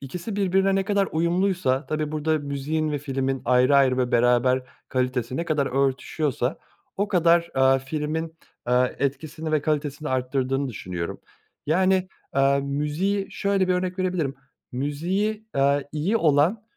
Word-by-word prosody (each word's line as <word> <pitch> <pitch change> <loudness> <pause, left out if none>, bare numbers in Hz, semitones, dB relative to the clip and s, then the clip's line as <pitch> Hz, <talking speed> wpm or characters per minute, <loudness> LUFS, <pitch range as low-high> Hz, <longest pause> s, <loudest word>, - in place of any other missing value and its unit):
ikisi 180 - -6
birbirine 195 0 +2
ne 195 - +1
kadar 200 -1 +1
uyumluysa, 170 -4 +1
tabii, 155 0 -2
burada 155 +1 0
müziğin 150 +2 -2
ve 145 - -1
filmin 135 -2 -2
ayrı 125 +3 +4
ayrı 130 -2 +4
ve 125 -1 0
beraber 125 +2 +3 0.3
kalitesi 125 -1 -1
ne 170 - -1
kadar 150 -4 0
örtüşüyorsa 135 0 -1 0.4
o 200 +1 0
kadar, 170 -2 +3
eee, 135 0 +5
filmin, 155 +4 -3 0.3
eee, 125 0 +2
etkisini 155 +3 -3
ve 150 - +2
kalitesini 150 0 -2
artırdığını 130 +1 -1
düşünüyorum. 90 -7 -5 0.5
Yani, 185 +3 +2 0.3
eee, 140 0 +4
müziği 150 +8 -1
şöyle 200 -2 0
bir 185 - +3
örnek 180 +1 -2
verebilirim; 180 -7 -1 0.4
müziği, 180 - -2
aaa, 140 +1 +3
iyi 170 +9 0
olan 160 +5 +3
150 Hz, 140 wpm, -24 LUFS, 135-180 Hz, 0.5 s, eee